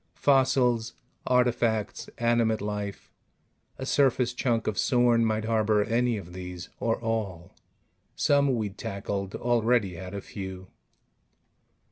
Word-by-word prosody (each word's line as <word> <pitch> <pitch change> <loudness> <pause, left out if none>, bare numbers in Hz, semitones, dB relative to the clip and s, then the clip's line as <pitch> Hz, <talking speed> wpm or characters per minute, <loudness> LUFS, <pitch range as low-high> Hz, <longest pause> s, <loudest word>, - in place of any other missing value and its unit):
Fossils, 125 -4 +2 0.3
artifacts, 120 -4 +1
animate 115 -2 +2
life... 105 -1 -5 0.7
a 130 - -5
surface 130 -3 +2
chunk 120 -2 0
of 110 - -1
Sorn 120 -2 +3
might 110 -1 0
harbor 110 -2 +2
any 120 +1 +1
of 90 -3 -9
these, 90 -1 -7
or 115 -1 0
all. 100 -6 -3 0.6
Some 140 -2 +3
we'd 105 -3 -4
tackled 100 0 -4
already 120 -4 +1
had 90 +3 -7
a 100 - -4
few. 95 -2 -8
110 Hz, 115 wpm, -27 LUFS, 100-120 Hz, 0.7 s, Sorn